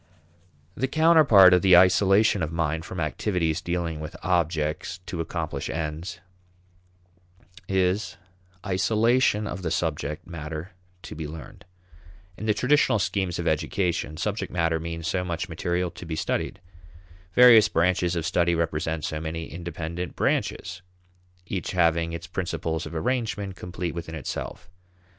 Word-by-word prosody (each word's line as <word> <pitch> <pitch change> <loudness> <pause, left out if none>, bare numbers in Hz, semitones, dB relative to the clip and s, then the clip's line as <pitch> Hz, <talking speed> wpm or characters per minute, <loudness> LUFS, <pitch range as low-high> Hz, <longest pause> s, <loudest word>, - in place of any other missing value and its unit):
The 130 +7 -1
counterpart 150 - +6
of 90 - +5
the 95 -2 +7
isolation 95 +3 +4
of 80 -1 -2
mind 80 0 -1
from 95 - -6
activities 80 0 -1
dealing 85 -3 -2
with 75 +1 -7
objects 85 -1 0
to 85 - -4
accomplish - - -4
ends 80 +2 -4 1.5
is 95 +2 0 0.5
isolation 110 +3 +2
of 95 -3 -5
the 85 - -2
subject 75 -2 -2
matter 80 0 -7 0.3
to - - -8
be 80 -1 -5
learned. 80 +2 -10 0.7
In 110 - -6
the 105 - +4
traditional 135 0 +3
schemes 95 -3 -1
of 85 - -3
education, 80 0 -1
subject 105 +5 -3
matter 85 -2 +1
means 85 0 -5
so 90 +2 0
much 85 0 -3
material 85 +1 -2
to 85 - -10
be 80 - -3
studied. 95 - -2 0.8
Various 115 -4 +8
branches 90 0 +1
of 85 -2 -2
study 85 +1 +2
represent 80 -1 -1
so 75 0 -3
many 80 0 -5
independent 85 0 -5
branches, 90 +1 -1 0.6
each 95 -1 -4
having 85 -2 +2
its 85 - -6
principles 85 -3 -3
of - - -9
arrangement 105 +1 -2
complete 90 -1 -5
within 85 -1 -6
itself. 80 +2 -6
85 Hz, 135 wpm, -25 LUFS, 80-95 Hz, 1.5 s, Various